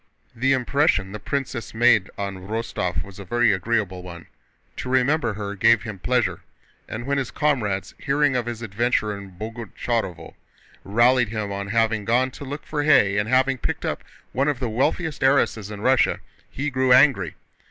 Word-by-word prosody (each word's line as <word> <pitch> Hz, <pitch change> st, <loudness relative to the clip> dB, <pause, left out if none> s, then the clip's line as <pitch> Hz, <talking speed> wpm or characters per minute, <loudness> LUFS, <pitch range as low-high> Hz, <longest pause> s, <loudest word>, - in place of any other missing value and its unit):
The 130 Hz, +3 st, +2 dB
impression 130 Hz, -6 st, +1 dB
the 105 Hz, -, -6 dB
princess 130 Hz, 0 st, -4 dB
made 115 Hz, -4 st, +4 dB
on 95 Hz, -2 st, -5 dB
Rostóv 105 Hz, -4 st, -2 dB
was 100 Hz, 0 st, -13 dB
a -, -, -6 dB
very 120 Hz, +3 st, +2 dB
agreeable 95 Hz, -2 st, -1 dB
one. 85 Hz, -2 st, -10 dB, 0.5 s
To 125 Hz, -, -5 dB
remember 130 Hz, -1 st, +2 dB
her 100 Hz, -1 st, -4 dB
gave 110 Hz, +3 st, +4 dB
him 105 Hz, -5 st, -7 dB
pleasure, 125 Hz, +3 st, 0 dB, 0.5 s
and 115 Hz, +2 st, -5 dB
when 140 Hz, +1 st, 0 dB
his 130 Hz, -, -3 dB
comrades, 105 Hz, -, -1 dB
hearing 140 Hz, 0 st, +1 dB
of 120 Hz, -2 st, -1 dB
his 120 Hz, -1 st, -5 dB
adventure 110 Hz, 0 st, 0 dB
at 100 Hz, -2 st, -11 dB
Boguchárovo, 110 Hz, -2 st, -4 dB, 0.5 s
rallied 120 Hz, +3 st, +3 dB
him 105 Hz, -2 st, -3 dB
on 100 Hz, 0 st, -4 dB
having 110 Hz, 0 st, +1 dB
gone 125 Hz, +5 st, +2 dB
to 145 Hz, -, -10 dB
look 145 Hz, +2 st, -6 dB
for 150 Hz, -1 st, -2 dB
hay 105 Hz, -9 st, +4 dB
and 105 Hz, +2 st, -2 dB
having 130 Hz, +1 st, +2 dB
picked -, -, -3 dB
up -, -, -3 dB, 0.3 s
one 135 Hz, +3 st, 0 dB
of 145 Hz, -4 st, 0 dB
the 125 Hz, -3 st, -2 dB
wealthiest 140 Hz, +7 st, -1 dB
heiresses 130 Hz, -6 st, +2 dB
in 105 Hz, -1 st, -7 dB
Russia, 130 Hz, +1 st, +3 dB, 0.3 s
he 145 Hz, +2 st, -3 dB
grew 130 Hz, 0 st, +1 dB
angry. 125 Hz, -, +5 dB
115 Hz, 175 wpm, -23 LUFS, 100-130 Hz, 0.5 s, angry